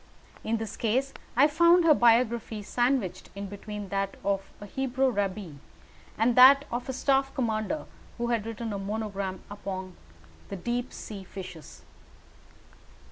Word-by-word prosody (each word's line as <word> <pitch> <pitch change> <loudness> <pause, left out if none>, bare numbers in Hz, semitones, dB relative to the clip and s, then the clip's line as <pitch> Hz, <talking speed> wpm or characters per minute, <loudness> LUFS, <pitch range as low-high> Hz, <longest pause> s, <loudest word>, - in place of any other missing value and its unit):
In 225 +1 0
this 220 -1 -6
case 255 +5 0 0.2
I 265 +4 +6
found 340 +3 +5
her 315 - +8
biography 235 -3 +2
sandwiched 240 -3 0
in 200 0 -5
between 205 0 -7
that 195 0 -2
of 195 0 -1
a 205 - -8
Hebrew 260 +3 0
rabbi 200 -4 -2 0.7
and 230 +2 +3
that 275 +3 +8
of 245 +2 -3
a - - +1
staff 270 +1 +2
commander 230 +3 -1 0.3
who 240 0 -2
had 230 -2 0
written 225 -1 -4
a 200 - -3
monograph 200 -2 -3
upon 190 -2 -6 0.5
the - - -4
deep 240 +6 -3
sea 200 -3 -8
fishes. 185 -5 -10
225 Hz, 140 wpm, -28 LUFS, 200-255 Hz, 0.7 s, her